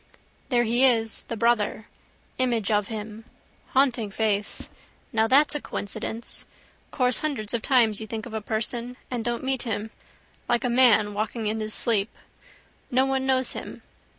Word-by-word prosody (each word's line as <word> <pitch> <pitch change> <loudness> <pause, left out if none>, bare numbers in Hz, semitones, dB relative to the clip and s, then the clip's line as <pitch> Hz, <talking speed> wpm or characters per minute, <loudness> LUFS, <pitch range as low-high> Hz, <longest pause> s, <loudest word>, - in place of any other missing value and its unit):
There 240 -2 +3
he 240 +3 +2
is: 225 -4 +2
the 230 - -5
brother. 220 -2 +1 0.5
Image 235 -5 +1
of 210 -1 +2
him. 215 0 -6 0.4
Haunting 255 -5 +2
face. 205 0 -1 0.5
Now 220 0 +3
that's 280 +5 +5
a 295 - -3
coincidence. 220 +3 -5 0.5
Course 250 -2 +2
hundreds 260 -9 -2
of 235 - 0
times 225 -6 +3
you 220 - -6
think 220 0 -5
of 240 - -9
a 220 - -2
person 235 +3 -3
and 240 -2 -2
don't 240 +1 -2
meet 265 -1 0
him. 220 -2 -3 0.6
Like 240 +1 +2
a 250 - +1
man 225 -4 +5
walking 215 +2 -3
in 215 +1 0
his 215 0 -1
sleep. 220 -2 +1 0.8
No 260 +2 +3
one 265 0 0
knows 260 -1 +3
him. - - -8
230 Hz, 160 wpm, -25 LUFS, 215-250 Hz, 0.8 s, that's